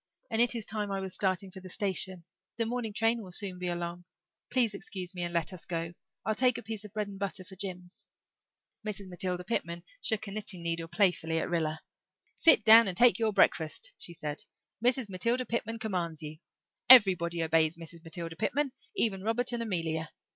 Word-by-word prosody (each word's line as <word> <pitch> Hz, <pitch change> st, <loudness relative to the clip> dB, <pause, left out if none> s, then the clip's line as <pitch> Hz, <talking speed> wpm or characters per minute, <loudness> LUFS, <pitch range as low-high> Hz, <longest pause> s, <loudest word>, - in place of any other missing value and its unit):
And 225 Hz, +1 st, +2 dB
it 240 Hz, 0 st, +3 dB
is 225 Hz, -3 st, -4 dB
time 210 Hz, -1 st, -3 dB
I 195 Hz, -, -1 dB
was 190 Hz, -1 st, -5 dB
starting 190 Hz, -1 st, -1 dB
for 190 Hz, -, -10 dB
the 185 Hz, 0 st, -11 dB
station. 190 Hz, -2 st, 0 dB, 0.3 s
The 230 Hz, -, 0 dB
morning 235 Hz, -1 st, -3 dB
train 225 Hz, +2 st, +1 dB
will 190 Hz, -3 st, -10 dB
soon 185 Hz, -1 st, +3 dB
be 180 Hz, -, -3 dB
along. 175 Hz, 0 st, -4 dB, 0.4 s
Please 240 Hz, -4 st, +2 dB
excuse 190 Hz, -2 st, -5 dB
me 180 Hz, -, -6 dB
and 175 Hz, 0 st, -2 dB
let 170 Hz, +1 st, 0 dB
us 180 Hz, -, -8 dB
go 165 Hz, -1 st, -4 dB, 0.3 s
I'll 220 Hz, -, +1 dB
take 250 Hz, +1 st, +2 dB
a -, -, -7 dB
piece 220 Hz, -1 st, -5 dB
of 210 Hz, -, -11 dB
bread 210 Hz, 0 st, -3 dB
and 195 Hz, -1 st, -10 dB
butter 195 Hz, -1 st, -3 dB
for 190 Hz, -, -12 dB
Jims." 180 Hz, -1 st, -7 dB, 0.8 s
Mrs. 205 Hz, -2 st, -4 dB
Matilda 180 Hz, 0 st, -2 dB
Pitman 170 Hz, -4 st, -3 dB, 0.2 s
shook 215 Hz, -2 st, 0 dB
a 200 Hz, -, -7 dB
knitting 200 Hz, -4 st, -3 dB
needle 165 Hz, 0 st, -2 dB
playfully 170 Hz, -2 st, +1 dB
at 165 Hz, -, -2 dB
Rilla. 160 Hz, -2 st, -1 dB, 0.5 s
"Sit 320 Hz, -9 st, +6 dB
down 225 Hz, +1 st, +8 dB
and 180 Hz, -2 st, -2 dB
take 235 Hz, -4 st, +5 dB
your 220 Hz, -1 st, +2 dB
breakfast," 195 Hz, -, +1 dB
she 170 Hz, -, -3 dB
said. 150 Hz, -2 st, -4 dB, 0.4 s
"Mrs. 250 Hz, -1 st, +2 dB
Matilda 230 Hz, +7 st, 0 dB
Pitman 230 Hz, -1 st, -3 dB
commands 175 Hz, -8 st, -3 dB
you. 155 Hz, +1 st, -7 dB, 0.5 s
Everybody 180 Hz, -8 st, +7 dB
obeys 160 Hz, 0 st, +2 dB
Mrs. 165 Hz, 0 st, -10 dB
Matilda 165 Hz, 0 st, -5 dB
Pitman 265 Hz, -, -1 dB, 0.2 s
even 195 Hz, -4 st, +1 dB
Robert 230 Hz, +4 st, +1 dB
and 235 Hz, -, -2 dB
Amelia. 165 Hz, -7 st, -2 dB
190 Hz, 195 wpm, -30 LUFS, 170-220 Hz, 0.8 s, down